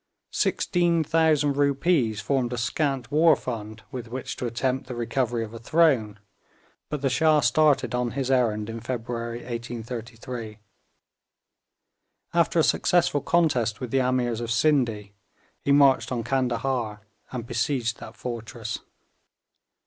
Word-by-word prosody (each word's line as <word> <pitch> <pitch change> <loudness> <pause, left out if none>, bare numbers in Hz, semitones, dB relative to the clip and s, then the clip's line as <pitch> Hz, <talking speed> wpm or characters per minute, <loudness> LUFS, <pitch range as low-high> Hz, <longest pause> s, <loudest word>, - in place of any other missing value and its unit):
Sixteen 170 -2 +1
thousand 150 -3 +2
rupees 140 -5 +2
formed 130 -3 0
a - - -3
scant 135 +1 -1
war 155 +1 +5
fund 110 -4 -6
with 125 -4 -6
which 125 +3 -5
to 125 - -2
attempt 130 +3 -1
the 125 - -6
recovery 120 0 -1
of 110 0 -8
a 115 - -7
throne, 120 -6 +2 0.7
but 150 -2 -4
the - - +3
Shah 155 +2 +4
started 140 +3 +3
on 125 -1 -1
his 135 -1 0
errand 110 -5 +1
in 115 0 -5
February 120 0 -4
1833. 115 -1 -6 1.8
After - - +2
a - - +5
successful 170 -5 +2
contest 130 -11 +1
with 125 -2 -5
the 135 - +3
Ameers 125 -2 0
of 120 - -4
Scinde, 120 -6 +1 0.5
he 140 - 0
marched 140 -2 +5
on 120 -2 -1
Candahar, 120 -3 -1 0.3
and 120 -3 -5
besieged 120 0 -1
that - - -10
fortress. 115 -2 -5
125 Hz, 135 wpm, -25 LUFS, 115-140 Hz, 1.8 s, war